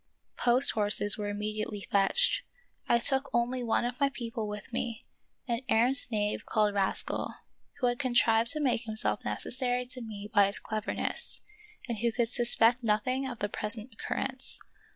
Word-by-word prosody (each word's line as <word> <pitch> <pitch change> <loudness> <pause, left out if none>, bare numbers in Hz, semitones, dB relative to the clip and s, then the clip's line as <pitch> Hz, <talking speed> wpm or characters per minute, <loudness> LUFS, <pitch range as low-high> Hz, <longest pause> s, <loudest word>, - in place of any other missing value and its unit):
Post 245 +2 +7
horses 205 -1 +3
were 205 -1 -4
immediately 210 0 -4
fetched. 205 - +2 0.5
I 235 - +5
took 270 +3 +4
only 240 +2 0
one 235 0 +1
of 245 +1 -4
my 280 - +3
people 230 -4 -4
with 210 +3 -7
me, 230 -1 -3 0.4
an 235 -1 -1
arrant 245 +5 +2
knave 210 -2 -1
called 210 -1 +1
Ras 195 -1 +1
cal, - - -4 0.4
who 260 - -1
had 245 0 +1
contrived 235 -3 +3
to 305 - -3
make 250 -3 +1
himself 220 -1 -1
necessary 250 -1 -2
to 250 0 -2
me 210 -3 -7
by 200 -1 +6
his 200 - -3
cleverness, 215 -1 -3 0.5
and 235 -4 -3
who 235 0 +1
could 235 0 0
suspect 240 0 +3
nothing 255 +5 0
of 245 -2 -6
the 205 - -1
present 215 +3 -5
occurrence. 260 +4 -3
230 Hz, 165 wpm, -30 LUFS, 210-250 Hz, 0.5 s, Post